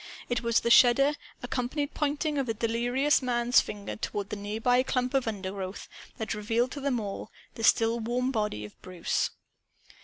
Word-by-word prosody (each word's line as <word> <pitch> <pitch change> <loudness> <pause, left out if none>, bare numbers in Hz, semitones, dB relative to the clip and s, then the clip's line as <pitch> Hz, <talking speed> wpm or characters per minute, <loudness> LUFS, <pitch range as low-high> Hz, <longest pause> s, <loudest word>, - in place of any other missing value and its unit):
It 245 -2 0
was 235 -1 +2
the 235 - 0
shudder 265 +4 +6 0.3
accompanied 260 +4 -2
pointing 295 0 -1
of 270 - -1
the 225 - -1
delirious 240 +6 +1
man's 245 -1 +3
finger, 205 -1 -6
toward 205 0 -4
the - - -2
nearby 220 +5 +1
clump 255 -1 -1
of 270 -3 +1
undergrowth, 195 -2 -5 0.3
that 220 0 -3
revealed 225 +4 0
to 285 - -6
them 270 -3 0
the 215 +1 -7
still 225 +1 +4
warm 245 +3 -1
body 210 - -2
of 105 - -14
Bruce. 180 -2 -1
235 Hz, 160 wpm, -28 LUFS, 210-255 Hz, 0.3 s, shudder